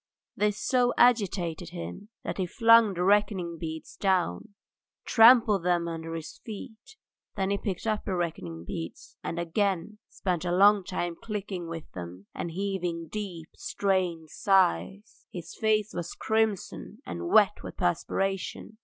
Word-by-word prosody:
This 210 0 +1
so 250 -2 +2
agitated 185 -8 +2
him 180 +4 -7
that - - -4
he 185 - 0
flung 230 0 +5
the 175 - -1
reckoning 190 -4 +2
beads 160 -1 -6
down, 185 - +1
and - - -18 0.5
trampled 225 -4 +6
them 175 -1 +1
under 165 0 -5
his 165 - -7
feet. 220 - -9 0.4
Then 195 -1 0
he 200 - 0
picked 190 -2 -4
up 215 -1 0
the 190 - -1
reckoning 90 - -3
beads, 80 -1 -7
and 170 - -4
again 190 +3 -1
spent 180 -3 -2
a 175 - -1
long 200 +2 +6
time 175 -2 -3
clicking 205 -5 -4
with 165 -2 -7
them 90 +2 -8
and 170 - -4
heaving 175 -2 -3
deep, 185 -7 -6
strained 180 -5 -1
sighs. 195 - +1
His 175 -2 -8
face 215 -1 +1
was 175 0 -5
crimson 220 -3 -1
and 85 0 -5
wet - - +5
with - - -9
perspiration. 195 - -2
185 Hz, 145 wpm, -28 LUFS, 170-210 Hz, 0.5 s, trampled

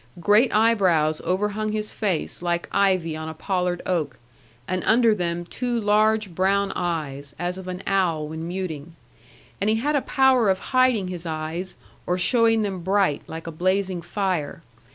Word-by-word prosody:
Great 210 +8 +4
eyebrows 185 -9 +3
overhung 210 +3 -1
his 215 0 -2
face, 190 -8 -2
like 175 -1 -1
ivy 185 -5 +1
on 160 0 -5
a 160 - -8
pollard 180 0 -2
oak, 155 -8 -1 0.5
and 185 0 -2
under 230 0 +4
them 175 -3 -2
two 240 +5 -2
large 215 -2 +2
brown 195 +3 +1
eyes, 150 -6 -3
as 175 +1 -2
of 190 -1 -9
an 185 +1 -5
owl 170 -6 +1
when 160 +2 -6
muting. 170 -3 -5 0.7
And 205 - +2
he 220 - +3
had 290 +7 0
a 285 - +2
power 260 -6 +3
of 190 - +3 0.2
hiding 255 -7 +3
his 175 -2 -6
eyes, 160 +3 -4 0.3
or 180 - +1
showing 225 +2 +3
them 195 -3 -3
bright, 190 -4 +1
like 160 0 -7
a 165 - -5
blazing 185 +2 0
fire. 180 -6 -2
185 Hz, 165 wpm, -24 LUFS, 170-210 Hz, 0.7 s, Great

